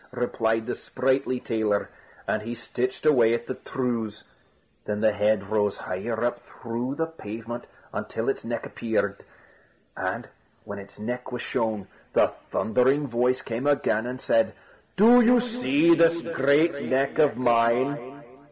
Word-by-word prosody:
replied 115 -2 0
the 125 - -2
sprightly 130 -1 0
tailor; 110 -4 0 0.4
and 110 - 0
he 115 +2 -5
stitched 125 +4 -3
away 120 -6 +5
at 120 0 -5
the - - -3
trews. 115 -5 -3 0.6
Then 105 0 -2
the 110 -1 +4
head 105 -1 +1
rose 105 -2 +1
higher 110 +5 -3
up 120 0 -1
through 120 +4 -5
the 160 - 0
pavement, 120 -6 -7 0.3
until - - -3
its - - -1
neck - - -4
appeared. 105 -3 -2 0.7
And - - -3 0.4
when 100 0 -7
its 100 0 -11
neck 125 +4 -5
was 125 0 -4
shown, 110 -4 -2 0.3
the - - +4 0.2
thundering 130 +6 +2
voice 125 +1 +1
came 120 +5 -3
again 120 -5 +1
and 125 +1 -5
said: 115 -3 +2 0.4
"Do 235 +4 +7
you 245 +1 +6
see 170 - +3
this 165 0 +4
great 145 0 +2
neck 135 +3 0
of 150 -2 +4
mine?" 125 +3 +1
120 Hz, 145 wpm, -26 LUFS, 110-140 Hz, 0.7 s, Do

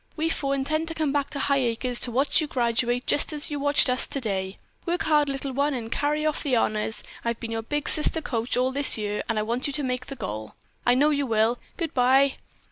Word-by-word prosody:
We 325 0 -1
four 275 -3 -1
intend 310 +4 -1
to 325 - -5
come 310 -3 -1
back 285 -1 -1
to - - -7
Highacres 250 -3 0
to 245 - +1
watch 275 +6 +2
you 310 - -3
graduate 240 -1 0
just 290 - +2
as 300 0 -2
you 290 - -3
watched 285 0 +3
us 250 0 +1
today. 195 -7 -3 0.3
Work 350 +4 -1
hard, 300 -4 +2
Little 275 0 -4
One, 280 +2 0
and 230 -2 -6
carry 300 +1 -1
off 305 -1 -1
the 270 -4 0
honors. 215 -1 -1 0.2
I've 235 -1 -2
been 230 - -6
your 225 0 -2
big 295 +6 -4
sister 310 +1 +6
coach 240 -6 -2
all 255 +1 +1
this 280 -2 +5
year, 210 -1 -3
and 225 - -1
I 215 - 0
want 235 +5 -2
you 285 - -4
to 295 0 +1
make 250 -1 -3
the 275 - -7
goal. 110 - -6 0.3
I 245 - +5
know 295 +4 +3
you 285 -2 -1
will! 225 +1 +1 0.2
Goodbye!" 270 -3 +2
265 Hz, 230 wpm, -25 LUFS, 235-290 Hz, 0.3 s, sister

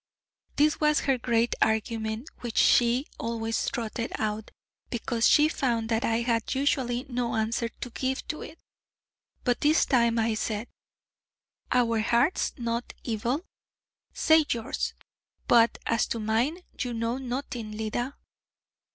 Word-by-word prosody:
This 300 +1 +3
was 300 -1 +3
her 270 -3 +1
great 235 0 +1
argument 220 +2 0
which 240 -2 -6
she 245 +3 +4
always 225 -1 -1
trotted 230 0 -3
out, 215 0 -2 0.4
because 235 -1 +1
she 300 +1 +6
found 235 -7 -1
that 225 0 +1
I 230 +1 +1
had 230 0 0
usually 260 -3 0
no 245 -2 -2
answer 225 +1 0
to 245 - -8
give 260 +2 -2
to 305 - -3
it. 315 - -9 0.9
But 245 -2 +1
this 305 +2 +4
time 235 -3 +3
I 225 0 +2
said: 215 +1 -3 1.0
'Our 230 -2 +3
hearts 240 +9 +2
not 235 -1 -3
evil? 240 - -1 0.7
Say 315 0 +4
yours: 230 -2 -2 0.5
but 235 -2 +5
as 230 -1 +1
to 230 - -3
mine 235 +11 0 0.2
you 245 -2 -2
know 230 +3 -1
nothing, 245 -4 -4
Leda.' 240 +5 -2
235 Hz, 135 wpm, -27 LUFS, 225-260 Hz, 1.0 s, she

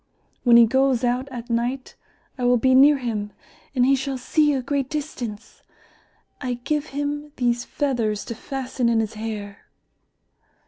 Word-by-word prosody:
When 240 -2 +7
he 235 - +8
goes 265 +1 +2
out 250 +3 0
at 240 -1 -7
night 245 +3 -2 0.4
I 255 - -5
will 245 0 +4
be 260 +2 +3
near 280 +3 +7
him 215 -5 -4 0.4
and 250 -1 +4
he 275 +1 +4
shall 270 0 -3
see 295 +4 +2
a 265 -3 -1
great 275 0 -1
distance. 245 -8 -6 0.8
I 250 -2 -2
give 295 +5 -2
him 290 +1 -4
these 240 0 0
feathers 230 -7 -1
to 235 - -5
fasten 255 0 -2
in 230 -1 +2
his 220 -1 -2
hair." 215 -2 -6
250 Hz, 155 wpm, -23 LUFS, 235-275 Hz, 0.8 s, he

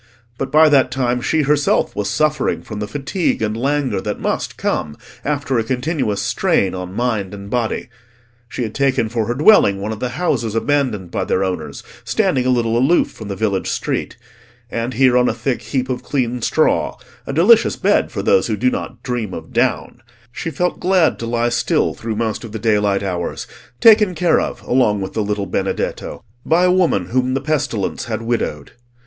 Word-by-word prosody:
But 135 - -3
by 155 +1 +6
that 135 -3 +4
time 125 -1 -1
she 155 +4 +1
herself 145 0 +1
was 105 -1 -2
suffering 150 -2 0
from 105 -2 -7
the 105 - -3
fatigue 145 - -1
and 105 0 -1
languor 130 -4 0
that - - -4
must - - -2
come 75 -1 -2 0.3
after 145 -4 -1
a - - 0
continuous 125 -4 -1
strain 95 -1 +1
on 90 0 -6
mind 110 -5 -1
and 100 0 -10
body. 120 -1 -1 0.6
She 125 - -3
had 110 -2 -4
taken 135 -5 +1
for 115 -2 -1
her 120 - -1
dwelling 140 - +5
one 105 +2 -3
of 110 - -5
the 125 +2 -4
houses 120 -11 -1
abandoned 115 -8 0
by - - -2
their 95 - 0
owners, 95 -1 -4 0.2
standing 130 -1 +1
a - - +3
little 120 -2 +1
aloof 140 +8 +3
from 110 - -10
the 100 - -4
village 100 -2 -1
street; - - -3 0.5
and 115 +2 -3
here 130 -1 +4
on 125 0 +4
a - - -2
thick 125 +2 -2
heap 130 -2 -2
of 125 -1 -3
clean 125 -2 -2
straw—a - - -1
delicious 205 +10 +5
bed - - +1
for - - -4
those 475 0 +3
who - - -1
do 255 - +2
not 250 - -6
dream 120 -6 -3
of 80 0 -9
down—she 120 +7 -3
felt 180 +2 -1
glad 180 -3 +2
to 115 - -4
lie 120 0 +1
still 120 0 +1
through 115 -1 -5
most 110 0 -2
of 115 -2 -9
the - - -3
daylight 105 -2 +1
hours, 90 -3 -3 0.3
taken 210 -5 +6
care 170 0 +3
of - - -5
along 115 -5 +2
with 95 -1 -5
the 110 - -1
little 105 -1 -2
Benedetto - - -3 0.2
by 165 +3 +2
a 180 - +4
woman 170 - +2
whom 130 +1 0
the - - +1
pestilence 135 -9 -2
had 115 0 -4
widowed. 115 -11 -2
120 Hz, 190 wpm, -19 LUFS, 105-145 Hz, 0.6 s, by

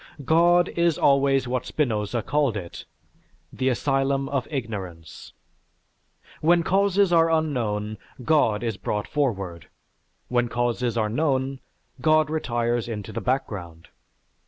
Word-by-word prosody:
God 175 +3 +4
is 170 -2 +1
always 135 -2 +3
what 125 0 -2
Spinoza 115 -5 -1
called 140 -6 +1
it, 85 -4 -8 0.7
"the 130 0 0
asylum 135 +1 0
of 140 -3 -2
ignorance." 95 - -6 1.1
When 170 +2 +4
causes 195 0 +2
are 165 -1 +5
unknown, 115 -10 -1 0.3
God 120 -9 +2
is 115 -4 -2
brought 105 -1 -3
forward; 100 - -2 0.6
when 120 -1 +1
causes 120 0 -1
are 110 -2 +1
known, 135 +2 0 0.4
God 155 +1 +3
retires 120 -6 -1
into 110 -2 -5
the 115 - -3
background. 95 -10 -3
130 Hz, 115 wpm, -24 LUFS, 110-150 Hz, 1.1 s, are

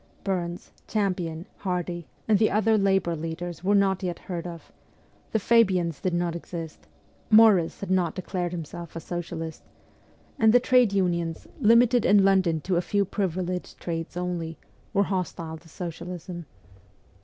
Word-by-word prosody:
Burns, 175 -3 -3 0.2
Champion, 180 -5 -1
Hardie, 175 -3 -3 0.2
and 215 -3 +4
the 215 - +4
other 220 +2 +3
labour 195 -4 +2
leaders 165 +2 -5
were 200 +2 +3
not 195 -1 +3
yet 180 -3 -2
heard 175 -2 -5
of; 170 -2 -10 0.6
the - - +2
Fabians 190 -7 +3
did 180 -2 0
not 175 -1 0
exist; 165 -2 -7 0.4
Morris 215 -6 +5
had 195 -2 -4
not 180 -3 +1
declared 180 -2 -3
himself 170 0 -7
a - - -3
socialist; 165 -1 -5 0.8
and 220 0 +5
the 245 - +7
trade 250 -3 +4
unions, 170 -4 0
limited 235 +2 +5
in 205 -1 +5
London 185 -5 +3
to 180 +3 0
a - - +3
few 200 +2 +1
privileged 185 -2 -3
trades 165 0 -4
only, 170 -3 -3 0.3
were 200 -2 +3
hostile 170 -4 -3
to 165 +1 -19
socialism. 175 0 -7
180 Hz, 145 wpm, -26 LUFS, 170-200 Hz, 0.8 s, the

